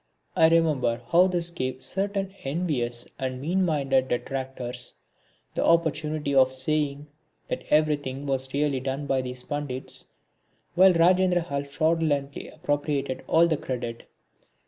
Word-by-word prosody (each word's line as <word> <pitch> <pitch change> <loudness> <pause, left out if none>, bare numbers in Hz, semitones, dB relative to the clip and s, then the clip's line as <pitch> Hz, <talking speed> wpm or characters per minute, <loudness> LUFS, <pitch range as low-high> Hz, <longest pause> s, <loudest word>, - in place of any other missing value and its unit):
I 160 - +6
remember 145 -8 +2
how 175 +2 +6
this 175 -2 -1
gave 130 -5 -3
certain 195 0 -2
envious 135 -6 -2
and 130 -1 -3
mean 175 +7 +1
minded 135 -6 +1
detractors 130 -1 -4 0.6
the - - 0
opportunity 155 -3 +1
of 130 -1 +5
saying 145 +2 -1 0.4
that - - -3
everything 145 -3 +1
was 135 -1 -1
really 140 -1 +1
done 135 +2 -3
by 135 -2 +1
these 125 0 -6
Pandits 145 -3 -5 0.7
while 185 +1 +6
Rajendrahal 175 -4 +2
fraudulently 150 -2 0
appropriated 145 -2 -2
all 165 +1 +5
the 160 -3 +1
credit. 120 -3 -5
145 Hz, 125 wpm, -26 LUFS, 130-165 Hz, 0.7 s, I